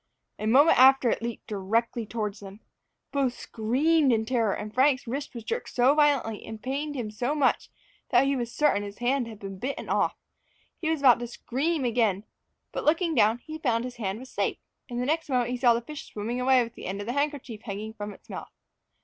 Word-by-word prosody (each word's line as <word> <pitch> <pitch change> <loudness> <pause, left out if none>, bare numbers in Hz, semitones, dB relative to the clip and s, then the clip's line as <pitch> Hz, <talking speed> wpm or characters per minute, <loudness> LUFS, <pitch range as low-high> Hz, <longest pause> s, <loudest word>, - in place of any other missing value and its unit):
A 215 - -2
moment 280 +8 +6
after 265 -2 +6
it - - -1
leaped 235 0 -5
directly 220 +3 -1
towards 210 -3 -3
them. 200 +1 -11 0.5
Both 265 -4 0
screamed 270 +6 +2
with 220 -1 +1
terror, 230 -4 +1
and 210 0 -6
Frank's 265 +2 +3
wrist 270 +3 -5
was 235 - -6
jerked 465 - -3
so 255 +3 +4
violently, 285 -8 +2
and 220 -1 -8
pained 285 +5 -3
him 230 -5 -4
so 245 +7 -1
much, 285 -4 +1 0.4
that 250 +1 +4
he 275 0 +1
was 240 -2 -3
certain 295 -8 +2
his 200 0 -7
hand 245 +1 0
had 220 -2 -9
been 195 -2 -8
bitten 275 +5 -4
off. - - +1 0.6
He 315 - -1
was 320 -3 0
about 250 -4 +6
to 240 - -4
scream 275 +5 -2
again; 225 -5 +1 0.5
but - - -4
looking 330 +2 +2
down, 225 -2 +3
he 315 0 -7
found 235 -6 +1
his 250 -1 -7
hand 200 -3 -2
was 260 +3 -11
safe, - - -1 0.3
and 240 -1 -3
the 250 - -1
next 315 +2 -1
moment 250 -1 0
saw 240 -3 +6
the 235 - -1
fish 295 +5 -9
swimming 230 +4 -3
away 255 -1 +4
with 230 0 -8
the - - -8
end 195 +2 -3
of 205 - -5
the 240 - -2
handkerchief 280 -6 -2
hanging 215 0 -6
from 210 -1 -6
its - - -16
mouth. - - -7
245 Hz, 215 wpm, -27 LUFS, 220-275 Hz, 0.6 s, moment